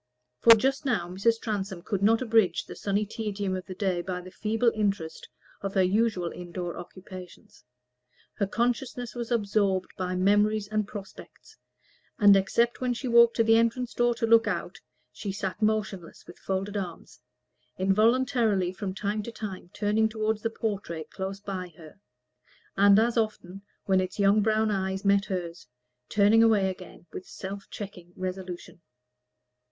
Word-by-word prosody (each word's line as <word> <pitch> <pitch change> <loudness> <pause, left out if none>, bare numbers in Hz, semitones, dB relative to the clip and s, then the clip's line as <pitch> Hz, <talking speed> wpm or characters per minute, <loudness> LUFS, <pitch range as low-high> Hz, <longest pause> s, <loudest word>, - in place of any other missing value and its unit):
For, 230 - +9
just 270 +5 0
now, 215 -11 0
Mrs. 225 +5 +1
Transome 195 -5 -4
could 200 -2 -2
not 225 +4 +3
abridge 220 -7 +2
the - - -9
sunny 205 +1 -1
tedium 205 -3 -3
of 185 - -6
the 185 - -7
day 185 -3 0
by 180 0 -4
the 180 +1 -11
feeble 225 +4 +1
interest 200 -7 -2 0.3
of 195 0 -4
her 190 - +4
usual 190 -2 +1
indoor 175 0 -6
occupations. 185 -4 -11 0.7
Her 200 - -1
consciousness 245 +2 -2
was 240 -2 -5
absorbed 200 -4 +1
by 185 0 -2
memories 205 +3 +2
and 215 -1 -1
prospects, 205 -3 -11 0.6
and 205 -2 +7
except 235 +5 +1
that 250 -2 -1
she 260 - -4
walked 235 -1 +6
to 230 - +3
the 225 0 +5
entrance 230 +2 0
door 240 0 +2
to 235 - -1
look 225 0 +5
out, - - -3 0.3
she 205 - -5
sat 195 +1 -4
motionless 210 -5 -2
with 175 - -13
folded 195 +2 -3
arms, 180 -5 -6 0.6
involuntarily 215 -1 +2
from 190 -1 -5
time 205 +2 -2
to 235 - -7
time 200 -6 -7
turning 215 +1 +1
toward 220 0 -1
the 225 - -2
portrait 200 -8 -4
close 195 +1 -5
by 185 -3 -6
her, 160 +2 -14 0.8
and 200 0 +6
as 230 +2 +3
often, 200 -4 -3 0.2
when 190 -1 +3
its 185 0 -5
young 200 +1 +4
brown 215 0 +2
eyes 190 0 -2
met 200 0 +4
hers, 170 -8 -5 0.4
turning 210 +2 +5
away 210 -4 +4
again 185 -1 -12
with 185 - -7
self 195 +1 -8
checking 180 -4 -9
resolution. 185 -2 -6
200 Hz, 160 wpm, -27 LUFS, 185-225 Hz, 0.8 s, For